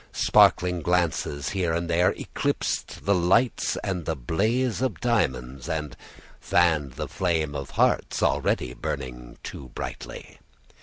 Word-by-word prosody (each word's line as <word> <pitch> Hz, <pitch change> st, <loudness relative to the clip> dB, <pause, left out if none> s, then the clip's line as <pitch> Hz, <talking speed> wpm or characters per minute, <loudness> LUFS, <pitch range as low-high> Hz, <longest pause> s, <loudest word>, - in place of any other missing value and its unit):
Sparkling 90 Hz, -1 st, +4 dB
glances 80 Hz, -4 st, 0 dB
here 90 Hz, -4 st, 0 dB
and 85 Hz, +1 st, -2 dB
there 85 Hz, +2 st, +3 dB
eclipsed -, -, -3 dB
the 100 Hz, -, +4 dB
lights 95 Hz, +7 st, +2 dB
and 90 Hz, -5 st, -2 dB
the 80 Hz, -, -1 dB
blaze 110 Hz, -, 0 dB
of 130 Hz, -5 st, 0 dB
the -, -, -18 dB
diamonds, 65 Hz, -, -1 dB
and 75 Hz, -3 st, -3 dB, 0.4 s
fanned 80 Hz, -6 st, +2 dB
the -, -, -4 dB
flame 80 Hz, -5 st, 0 dB
of 70 Hz, -2 st, -5 dB
hearts -, -, +2 dB
already 60 Hz, -, +1 dB
burning -, -, -6 dB
too 65 Hz, -, -8 dB
brightly. -, -, -7 dB
85 Hz, 135 wpm, -26 LUFS, 70-90 Hz, 0.4 s, Sparkling